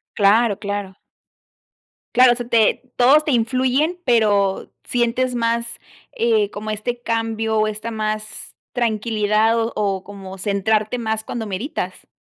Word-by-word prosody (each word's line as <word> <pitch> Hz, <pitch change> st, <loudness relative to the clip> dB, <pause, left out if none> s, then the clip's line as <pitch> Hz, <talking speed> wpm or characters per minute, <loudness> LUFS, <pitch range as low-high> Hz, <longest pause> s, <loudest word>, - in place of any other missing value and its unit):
Claro, 210 Hz, +1 st, +4 dB
claro. 200 Hz, -2 st, -4 dB, 1.2 s
Claro, 250 Hz, 0 st, +7 dB
se 245 Hz, 0 st, -5 dB
te 230 Hz, -2 st, +3 dB
todos 280 Hz, +5 st, +5 dB
te 295 Hz, -, +1 dB
influyen, 260 Hz, +8 st, +1 dB
pero, 205 Hz, -5 st, +2 dB
¿sientes 245 Hz, +1 st, 0 dB
más, 235 Hz, 0 st, 0 dB, 0.5 s
eh, 450 Hz, -3 st, +2 dB
como 215 Hz, +1 st, -5 dB
este 240 Hz, +3 st, -4 dB
cambio, 225 Hz, -1 st, -1 dB
o, 215 Hz, -, +2 dB
esta 215 Hz, +2 st, -5 dB
más 215 Hz, 0 st, -4 dB, 0.2 s
tranquilidad, 220 Hz, -1 st, +1 dB
o 225 Hz, +1 st, -1 dB
o, 195 Hz, -3 st, -1 dB
como 195 Hz, -1 st, -9 dB
centrarte 210 Hz, +4 st, 0 dB
más 220 Hz, -2 st, -2 dB
cuando 225 Hz, -2 st, -4 dB
meditas? 215 Hz, -, -5 dB
225 Hz, 130 wpm, -20 LUFS, 210-245 Hz, 1.2 s, Claro